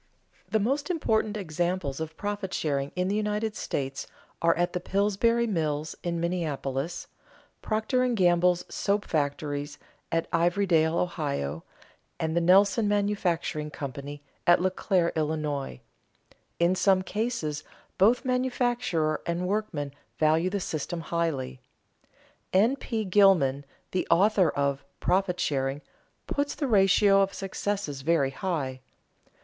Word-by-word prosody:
The 220 - +2
most 275 - 0
important 220 - 0
examples 175 -5 -2
of 160 0 -5
profit 205 -2 -3
sharing 140 -2 -1
in 180 0 0
the 200 - 0
United 210 0 -1
States 135 -7 -3 0.3
are 165 0 +4 0.2
the 180 - -2
Pillsbury 210 +5 +1
Mills 155 -7 -2
in 170 -1 -2
Minneapolis, 160 -4 -2 0.6
Procter 220 +4 0
and 250 -2 +1
Gamble's 175 -1 +3
soap 205 +1 -1
factories 145 -1 -2 0.3
at 165 0 0
Ivorydale, 170 -1 +2
O., 80 - -2 0.6
and 160 0 -1
the 170 - +3
Nelson 200 +4 +4
Mfg. 180 -7 0
Co. 140 +1 -6 0.3
at 175 - +7
Leclaire, 185 -1 +1
Ill. 155 -1 0 1.3
In 170 +1 +3
some 185 0 +3
cases 200 -9 -2 0.4
both 235 +7 +4
manufacturer 245 -10 0
and 170 +1 -1
workman 180 -9 -2 0.2
value 160 +3 +3
the 200 +1 -2
system 165 -1 -4
highly. 150 -7 -2 0.9
N. 220 +8 +4
P. 225 -5 -3
Gilman, 180 -9 +4 0.3
the 185 - -1
author 195 -1 +4
of 140 -1 -1 0.2
"Profit 180 0 +1
Sharing," 135 0 -1 0.4
puts 285 0 -2
the 285 - -2
ratio 195 -2 +5
of 195 0 0
successes 195 -6 -3
very 140 -2 +2
high. 140 -6 -3
175 Hz, 120 wpm, -27 LUFS, 155-205 Hz, 1.3 s, at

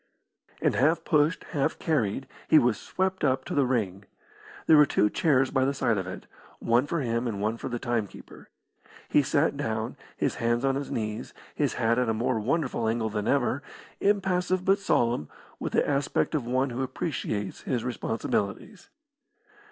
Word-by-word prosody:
And - - +3
half 155 +6 +2
pushed, 150 0 +2
half 145 +1 0
carried, 135 - -1 0.2
he 160 - +6
was 120 -7 +3
swept 190 0 -2
up 135 -2 +1
to - - -5
the 140 -3 +2
ring. 100 -6 -1 0.6
There 160 - +7
were 150 -1 +7
two 105 -4 +2
chairs 135 -5 +2
by 130 -1 +2
the 140 +1 0
side 115 -5 +1
of 95 - -4
it, 95 - -7 0.3
one 120 +4 +2
for 170 0 -1
him 115 -1 -1
and 105 -4 -3
one 110 +2 0
for - - -5
the 120 - -2
timekeeper. 115 -4 -4 0.6
He - - +5
sat 145 +2 +1
down, 110 -5 -3 0.2
his - - -1
hands 120 +2 +1
on 135 - +2
his 140 +1 -3
knees, 110 -1 -4 0.2
his - - 0
hat 115 +2 +2
at 125 -2 +1
a 110 - +1
more 115 +1 0
wonderful 125 -1 0
angle 110 -1 0
than 105 -1 -2
ever, 140 0 +1 0.4
impassive 185 -2 +1
but 195 +1 +4
solemn, 120 - +1 0.3
with - - -4
the - - +2
aspect 140 +2 0
of 140 -6 -1
one 130 +2 +1
who 120 +2 -3
appreciates 125 - -3
his 125 -4 -2
responsibilities. 120 - -3
125 Hz, 175 wpm, -27 LUFS, 115-145 Hz, 0.6 s, There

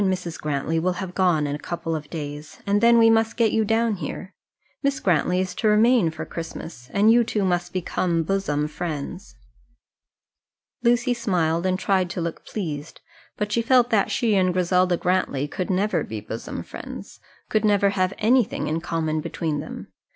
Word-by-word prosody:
and 190 -2 +2
Mrs. 180 -3 -4
Grantly 150 +2 -1
will 180 +2 +1
have 180 0 -6
gone 175 -6 +2
in 145 - -2
a - - -7
couple 165 0 -3
of 150 -1 -6
days, 150 -2 -7
and 205 +1 +2
then 235 0 +6
we 225 -1 +6
must 225 0 +3
get 230 -3 +3
you 220 - +2
down 225 0 +1
here. 180 +4 -6 0.5
Miss 280 -1 0
Grantly 180 0 +2
is 185 -1 -2
to 220 - -1
remain 215 -2 +4
for 160 - -6
Christmas, 160 -6 -8
and 210 +3 +4
you 240 +1 +5
two 210 -3 -1
must 175 -1 0
become 175 -2 -1
bosom 155 -5 0
friends." 155 - -6 1.5
Lucy 240 +1 +3
smiled, 180 -7 0
and 185 0 +1
tried 190 -2 +1
to 175 - -4
look 170 -1 -4
pleased, 160 -7 -5 0.4
but 210 0 -2
she 235 - +2
felt 245 +1 +3
that 210 -3 +3
she 235 -4 +1
and 185 -2 +3
Griselda 180 0 +2
Grantly 175 -7 0
could 180 +4 -4
never 195 +3 +1
be 110 0 -5
bosom 110 +2 -6
friends - - -9 0.3
could 215 0 +2
never 205 -2 +3
have 185 -2 +1
anything 235 +1 +2
in 160 +2 -1
common 160 -2 -1
between 160 -2 -3
them. - - -8
185 Hz, 180 wpm, -24 LUFS, 165-215 Hz, 1.5 s, then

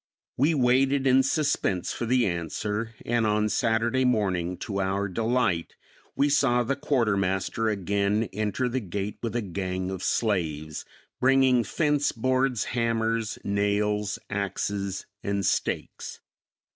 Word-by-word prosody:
We 150 +5 +2
waited 135 +1 +3
in 130 0 +5
suspense 130 - 0
for 120 - -3
the 125 0 +3
answer, 105 +6 -3
and 120 -1 +1
on 105 0 +1
Saturday 115 +4 +1
morning, 95 -8 0
to 100 -2 -2
our 95 +1 0
delight, 110 -4 0 0.4
we 140 - +3
saw 135 -4 +3
the 135 +4 -1
quartermaster 110 -5 0
again 100 +2 0
enter 110 +4 -1
the 125 +2 -1
gate 100 -1 -4
with 115 -1 -3
a 120 - 0
gang 95 -1 -3
of 95 -2 -5
slaves, 80 -10 -1 0.3
bringing 130 -2 +4
fence 145 +5 +1
boards, 130 -1 +1
hammers, 115 -2 0
nails, 105 0 0
axes 100 -1 -3 0.2
and 100 -1 -1
stakes. - - -2
110 Hz, 125 wpm, -26 LUFS, 100-125 Hz, 0.4 s, in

